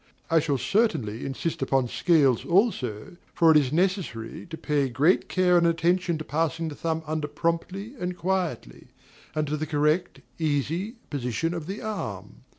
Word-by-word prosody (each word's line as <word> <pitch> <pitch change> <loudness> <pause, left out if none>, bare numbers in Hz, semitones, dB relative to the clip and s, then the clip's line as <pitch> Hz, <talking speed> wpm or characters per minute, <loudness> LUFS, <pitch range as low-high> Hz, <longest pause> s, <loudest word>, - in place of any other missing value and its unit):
I 165 - +6
shall 145 -2 0
certainly 130 - 0
insist 135 +4 -3
upon 135 -1 +1
scales 140 -4 +3
also, 170 - 0 0.2
for 165 -2 +6
it 155 - +7
is 135 -4 +2
necessary 175 - -1
to 165 -1 -7
pay 145 -4 0
great 150 +9 +2
care 180 -2 +4
and 170 - +3
attention 170 +1 +1
to 155 - -5
passing 165 +2 -1
the 150 - -8
thumb 160 0 -2
under 155 -1 -2
promptly 170 - -2
and 180 0 -3
quietly, 175 - -2 0.5
and 155 0 +1
to 150 +1 -2
the 155 +1 -3
correct, 150 +3 +1 0.2
easy 160 - -1 0.2
position 140 +4 -1
of 165 -3 -5
the 195 +3 -5
arm. 105 - -5
160 Hz, 160 wpm, -26 LUFS, 140-180 Hz, 0.5 s, it